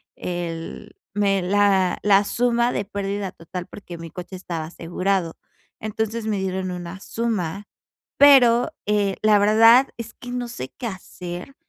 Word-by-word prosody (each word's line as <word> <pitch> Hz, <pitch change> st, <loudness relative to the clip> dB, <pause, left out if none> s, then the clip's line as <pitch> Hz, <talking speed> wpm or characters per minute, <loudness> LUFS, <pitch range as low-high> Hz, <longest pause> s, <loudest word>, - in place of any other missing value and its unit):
el 170 Hz, -2 st, -5 dB, 0.2 s
me 195 Hz, -2 st, +2 dB
la 190 Hz, -1 st, +2 dB
la 200 Hz, 0 st, +5 dB
suma 240 Hz, +1 st, +1 dB
de 205 Hz, -, -2 dB
pérdida 200 Hz, -1 st, -3 dB
total 180 Hz, +2 st, -7 dB
porque 175 Hz, -4 st, -10 dB
mi 165 Hz, -1 st, -9 dB
coche 185 Hz, +1 st, -8 dB
estaba 170 Hz, -3 st, -5 dB
asegurado. 175 Hz, +1 st, -2 dB, 0.4 s
Entonces 220 Hz, +1 st, -3 dB
me 210 Hz, -2 st, 0 dB
dieron 190 Hz, -1 st, -2 dB
una 180 Hz, +1 st, -7 dB
suma, 205 Hz, -5 st, -3 dB, 0.5 s
pero, 255 Hz, -1 st, +7 dB
eh, 205 Hz, -2 st, +1 dB
la 215 Hz, -1 st, +5 dB
verdad 225 Hz, +5 st, +6 dB
es 230 Hz, -1 st, -7 dB
que 245 Hz, -, -10 dB
no 245 Hz, -1 st, -3 dB
sé 130 Hz, -, -7 dB
qué 240 Hz, -, -4 dB
hacer 180 Hz, +3 st, -8 dB
200 Hz, 145 wpm, -23 LUFS, 180-225 Hz, 0.5 s, pero